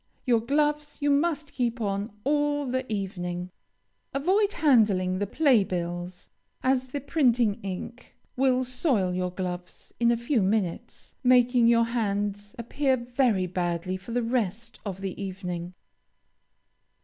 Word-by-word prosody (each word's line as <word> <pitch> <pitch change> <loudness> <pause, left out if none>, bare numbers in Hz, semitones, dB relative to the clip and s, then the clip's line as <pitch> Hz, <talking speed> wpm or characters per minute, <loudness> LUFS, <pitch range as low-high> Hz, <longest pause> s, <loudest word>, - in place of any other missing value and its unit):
Your 240 -3 +4
gloves 295 +4 0
you 290 -1 +2
must 300 0 0
keep 240 -1 -1
on 200 0 -2
all 290 0 +1
the 260 -1 -2
evening. 180 -3 -3 0.6
Avoid 390 +9 +2
handling 210 - +3
the 205 - -1
play 260 -3 +4
bills, 175 0 -4 0.4
as 260 0 +2
the 285 +3 -4
printing 245 -7 +2
ink 195 +5 -7 0.2
will 255 -1 +2
soil 250 - 0
your 180 0 -1
gloves 180 -1 -6
in 235 0 +4
a 235 - +3
few 235 0 +1
minutes, 190 -3 -2
making 245 -1 +5
your 230 0 +5
hands 205 -2 -2
appear 260 +3 0
very 240 -5 +1
badly 175 0 -2
for 185 +5 -9
the 245 +1 0
rest 230 -1 -2
of 195 -2 -5
the 195 0 -4
evening. 180 -2 -5
230 Hz, 135 wpm, -27 LUFS, 190-260 Hz, 0.6 s, making